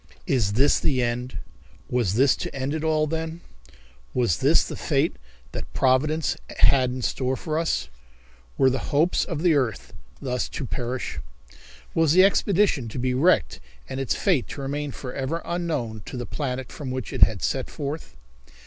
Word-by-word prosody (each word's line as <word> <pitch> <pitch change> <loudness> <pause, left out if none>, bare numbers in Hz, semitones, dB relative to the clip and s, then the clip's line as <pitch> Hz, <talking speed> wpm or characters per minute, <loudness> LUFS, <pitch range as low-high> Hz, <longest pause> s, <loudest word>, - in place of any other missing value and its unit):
Is 110 -7 +1
This 135 +6 +4
the 130 -4 +1
End? 120 +2 -2 0.5
Was 115 -6 0
this 135 +3 +5
to - - -5
end 135 +2 -2
it 160 0 -2
all, 155 -1 +2
then? 160 +2 -4 0.7
Was 120 -9 +2
this - - +4
the - - -6
fate - - 0 0.4
that - - -6
Providence 150 +5 +2 0.2
had 130 -2 +5
in 125 0 -4
store 130 +2 0
for 155 -2 -2
us? 160 - 0 0.7
Were 130 -1 +5
the 130 - -3
hopes 155 +5 +3
of 165 -1 -4
the 175 -3 +5
earth 130 -7 -1 0.3
thus 125 -2 -2
to 140 - -3
perish? 120 - -3 0.7
Was 160 -2 +3
the 185 +2 +7
expedition 195 - +3
to 110 - -7
be 125 0 0
wrecked 160 +9 +3 0.3
and 130 - -5
its 135 - 0
fate 175 - +1
to 140 - -7
remain 145 +2 -3
forever 135 +5 -4
unknown 150 -11 -2
to - - -6
the 120 - -4
planet 130 -3 -4
from 140 -3 -6
which 130 -1 -4
it - - -4
had 110 -4 +5
set 130 -2 -1
forth? 145 - -6
135 Hz, 170 wpm, -25 LUFS, 125-155 Hz, 0.7 s, the